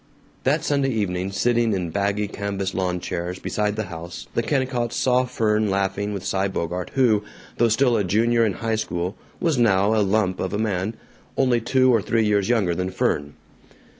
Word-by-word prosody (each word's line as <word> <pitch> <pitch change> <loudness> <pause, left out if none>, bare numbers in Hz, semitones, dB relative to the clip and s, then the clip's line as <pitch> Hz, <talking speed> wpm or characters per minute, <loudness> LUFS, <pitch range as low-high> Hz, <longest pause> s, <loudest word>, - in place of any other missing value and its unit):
That 150 +4 +2
Sunday 140 -4 +1
evening, 95 -5 -1
sitting 115 +2 +2
in 90 -4 -2
baggy 100 +2 0
canvas 100 -2 -3
lawn 90 -1 -1
chairs 90 +1 -4
beside 105 +2 -1
the 110 - -2
house, 85 -5 -8
the - - +1
Kennicotts 125 -2 -1
saw 125 0 +2
Fern 110 -3 +1
laughing 100 +1 -1
with 100 -2 -5
Cy 95 0 0
Bogart 90 -1 -4
who, 115 -6 +3 0.3
though 120 0 +3
still 120 +2 +3
a 105 - +2
junior 115 +5 +2
in 105 -3 +1
high 115 +1 -2
school, 90 -3 -3 0.2
was 165 -7 +1
now 100 -2 +3
a 110 - +3
lump 95 -2 +1
of 95 - -2
a - - 0
man, 105 0 -1 0.4
only 125 -3 +3
two 130 +2 +3
or 115 - +3
three 115 +2 +1
years 105 0 +1
younger 105 -8 +2
than 90 +2 -2
Fern. 75 -5 -1
105 Hz, 185 wpm, -23 LUFS, 95-120 Hz, 0.4 s, who